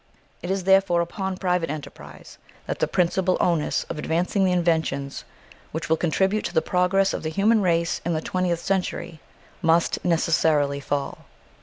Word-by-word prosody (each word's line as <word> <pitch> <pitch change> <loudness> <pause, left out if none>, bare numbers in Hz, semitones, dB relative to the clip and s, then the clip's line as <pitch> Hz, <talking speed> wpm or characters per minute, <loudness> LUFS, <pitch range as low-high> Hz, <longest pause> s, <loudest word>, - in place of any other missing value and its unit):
It 175 - -6
is 190 -1 -1
therefore 190 -2 +4
upon 190 +2 -4
private 180 -4 0
enterprise 150 0 -9 0.3
that - - -4
the - - +1
principal 185 0 +1
onus 170 -4 +1
of 155 - -7
advancing 175 +6 0
the 185 - +3
inventions 160 -5 -1 0.5
which 160 +1 -5
will 160 - +4
contribute 190 +6 0
to - - -5
the 160 - +4
progress 190 +2 +2
of - - -3
the 155 - -3
human 210 +6 +2
race 170 -3 +1
in 170 0 -1
the - - 0
twentieth 175 -1 -1
century 180 -4 -2 0.4
must 165 0 +2
necessarily 160 -4 +2
fall. 140 0 -4
175 Hz, 160 wpm, -24 LUFS, 160-185 Hz, 0.5 s, therefore